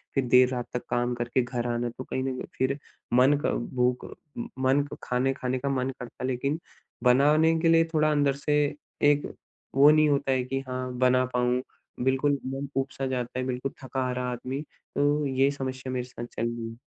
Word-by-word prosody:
फिर 135 Hz, -, +2 dB
देर 125 Hz, +1 st, +6 dB
रात 125 Hz, -1 st, -3 dB
तक 125 Hz, -, -2 dB
काम 120 Hz, 0 st, +1 dB
करके 120 Hz, +2 st, 0 dB
घर 120 Hz, -1 st, -3 dB
आना, 120 Hz, 0 st, -1 dB
तो 130 Hz, +2 st, -8 dB
कहीं 130 Hz, -, -3 dB
न 135 Hz, -1 st, -1 dB
कहीं -, -, -6 dB
फिर 135 Hz, +2 st, +1 dB, 0.4 s
मन 130 Hz, +4 st, +6 dB
का -, -, +2 dB, 0.2 s
भूख 125 Hz, 0 st, +1 dB, 0.3 s
म 120 Hz, -, -4 dB, 0.2 s
मन 140 Hz, +2 st, +4 dB, 0.2 s
खाने-खाने 130 Hz, 0 st, 0 dB
का 140 Hz, -, -2 dB
मन 130 Hz, -1 st, 0 dB
करता, 125 Hz, 0 st, -8 dB
लेकिन 140 Hz, +5 st, -1 dB, 0.4 s
बनाने 150 Hz, +6 st, +5 dB
के 165 Hz, -, +2 dB
लिए 165 Hz, 0 st, +5 dB
थोड़ा 155 Hz, 0 st, +3 dB
अंदर 145 Hz, -2 st, +3 dB
से 150 Hz, 0 st, +4 dB, 0.5 s
एक 145 Hz, 0 st, -1 dB, 0.4 s
वो 140 Hz, +2 st, +8 dB
नहीं 155 Hz, 0 st, +5 dB
होता 140 Hz, -1 st, +1 dB
है 130 Hz, -1 st, +2 dB
कि 135 Hz, +1 st, -2 dB
हाँ, 130 Hz, 0 st, -3 dB
बना 130 Hz, 0 st, +4 dB
पाऊँ, 125 Hz, 0 st, +2 dB, 0.4 s
बिल्कुल 135 Hz, +2 st, +2 dB
मन 135 Hz, +2 st, -4 dB
ऊब-सा 135 Hz, 0 st, -2 dB
जाता 125 Hz, -1 st, -3 dB
है, 130 Hz, -, -1 dB
बिल्कुल 130 Hz, +1 st, -2 dB
थका-हारा 125 Hz, -1 st, -2 dB
आदमी। 130 Hz, +3 st, -4 dB
तो 145 Hz, 0 st, -1 dB
ये 135 Hz, 0 st, +2 dB
समस्या 130 Hz, -2 st, -5 dB
मेरे 125 Hz, -, -1 dB
साथ 125 Hz, -1 st, -8 dB
चल 115 Hz, -, 0 dB
रही 115 Hz, -1 st, -4 dB
है। 115 Hz, -, -11 dB
130 Hz, 190 wpm, -27 LUFS, 125-140 Hz, 0.5 s, वो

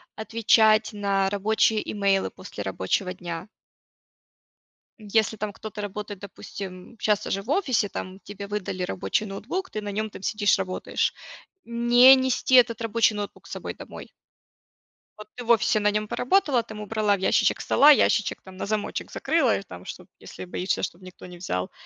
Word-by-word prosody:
отвечать 220 Hz, 0 st, +3 dB
на 195 Hz, -1 st, 0 dB
рабочие 215 Hz, +2 st, +1 dB
имейлы 195 Hz, -2 st, +1 dB
после 105 Hz, -, -8 dB
рабочего 95 Hz, -, -1 dB
дня. 175 Hz, 0 st, -7 dB, 1.5 s
Если 220 Hz, +1 st, 0 dB
там 215 Hz, 0 st, -4 dB
кто-то 215 Hz, +1 st, -8 dB
работает, 205 Hz, -1 st, -6 dB
допустим, 195 Hz, +1 st, -9 dB
щас 210 Hz, -2 st, +1 dB
уже 195 Hz, -, -1 dB
в 225 Hz, -, -14 dB
офисе 275 Hz, -, +1 dB
там, 185 Hz, +1 st, -7 dB
тебе 200 Hz, 0 st, -8 dB
выдали 195 Hz, -3 st, -3 dB
рабочий 95 Hz, -, -1 dB
ноутбук, 250 Hz, -, -5 dB
ты 215 Hz, -, -5 dB
на 205 Hz, -1 st, -5 dB
нем 215 Hz, +2 st, -2 dB
там 195 Hz, -, -11 dB
сидишь, 205 Hz, -1 st, +2 dB
работаешь- 185 Hz, -1 st, -2 dB, 0.5 s
не 240 Hz, +2 st, +6 dB
нести 260 Hz, 0 st, +1 dB
этот 235 Hz, -2 st, +5 dB
рабочий 225 Hz, -1 st, +2 dB
ноутбук 205 Hz, -1 st, -6 dB
с -, -, -14 dB
собой -, -, -5 dB
домой. -, -, -11 dB, 1.1 s
Вот 210 Hz, -1 st, -11 dB
ты 245 Hz, -, -7 dB
в -, -, -11 dB
офисе 220 Hz, -1 st, +3 dB
на 210 Hz, 0 st, +2 dB
нем 210 Hz, 0 st, -1 dB
поработала, 275 Hz, -, +2 dB
там 215 Hz, -2 st, -9 dB
убрала 210 Hz, -1 st, +1 dB
в -, -, -8 dB
ящичек 190 Hz, -, +2 dB
стола, 290 Hz, -, +5 dB
ящичек 220 Hz, -7 st, +2 dB
там 190 Hz, -1 st, -13 dB
на -, -, -4 dB
замочек 210 Hz, 0 st, -3 dB
закрыла, 310 Hz, -8 st, +1 dB
и -, -, -5 dB
там 90 Hz, -, -11 dB
что, -, -, -8 dB
если -, -, -10 dB
боишься, 180 Hz, +1 st, -2 dB
чтобы 180 Hz, +2 st, -5 dB
никто 185 Hz, -, -12 dB
не 180 Hz, -1 st, -11 dB
взял. 90 Hz, -, -3 dB
210 Hz, 165 wpm, -25 LUFS, 195-225 Hz, 1.5 s, не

